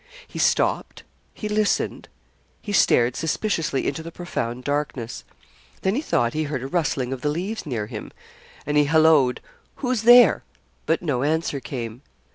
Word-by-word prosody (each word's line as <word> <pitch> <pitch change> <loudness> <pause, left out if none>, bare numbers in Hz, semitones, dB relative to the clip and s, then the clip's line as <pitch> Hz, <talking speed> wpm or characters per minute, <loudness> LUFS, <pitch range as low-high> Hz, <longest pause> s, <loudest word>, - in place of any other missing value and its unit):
He - - -8
stopped - - +1 0.3
he 215 - -6
listened 210 0 0 0.5
he 205 - -6
stared 120 -9 +4
suspiciously 165 -4 -1
into 145 +3 -2
the 165 +1 -8
profound 125 -9 -4
darkness. 145 -5 -3 0.6
Then 190 - +2
he 270 - 0
thought 120 - 0
he 155 0 -1
heard 140 -4 -4
a - - -4
rustling 135 -5 -1
of 130 - -7
the 150 - 0
leaves 185 +6 -4
near 115 -6 -2
him, 105 -1 -8 0.5
and 150 +1 0
he 150 - +5
hallooed, 155 -4 +4 0.3
'Who's 250 -4 -1
there?' 240 +2 +7 0.4
But 165 +2 +1
no 140 -7 0
answer 155 0 0
came. 120 -3 -6
150 Hz, 155 wpm, -23 LUFS, 130-175 Hz, 0.6 s, there